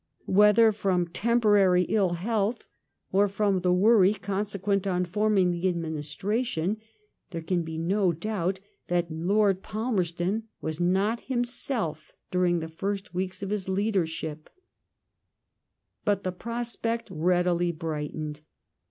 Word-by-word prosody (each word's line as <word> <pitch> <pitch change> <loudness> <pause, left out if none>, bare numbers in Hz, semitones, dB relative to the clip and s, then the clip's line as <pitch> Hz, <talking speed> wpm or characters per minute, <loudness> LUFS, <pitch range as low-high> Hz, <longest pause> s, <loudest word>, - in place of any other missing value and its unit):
Whether 210 +3 +6
from 185 -4 0
temporary 205 -3 +3
ill 190 -3 +1
health 215 +5 -1 0.4
or 200 +2 +4
from 200 -1 +1
the 180 0 +1
worry 200 +1 +5
consequent 200 0 -1
on 180 -1 +1
forming 195 0 +2
the 175 +2 0
administration, 170 - -2 0.5
therb 165 -3 -6
•oan 175 0 0
be 160 0 -6
no 185 +3 +2
doubt 190 +1 -2 0.3
that 175 -1 0
Lord 190 +4 +2
Palmerston 205 -2 -1
was 155 0 -4
not 195 +6 +1
himself 240 - -2 0.2
^during 180 -2 +2
the 160 - -4
first 195 +5 -4
weeks 185 +2 -3
of 195 - -4
his 200 -3 -2
leadership* 165 -6 -1 1.5
But 200 -1 +1
the 185 - -1
prospect 230 +2 -3
speedily 175 0 +1
brightened. 155 -1 -5
190 Hz, 115 wpm, -27 LUFS, 175-210 Hz, 1.5 s, Whether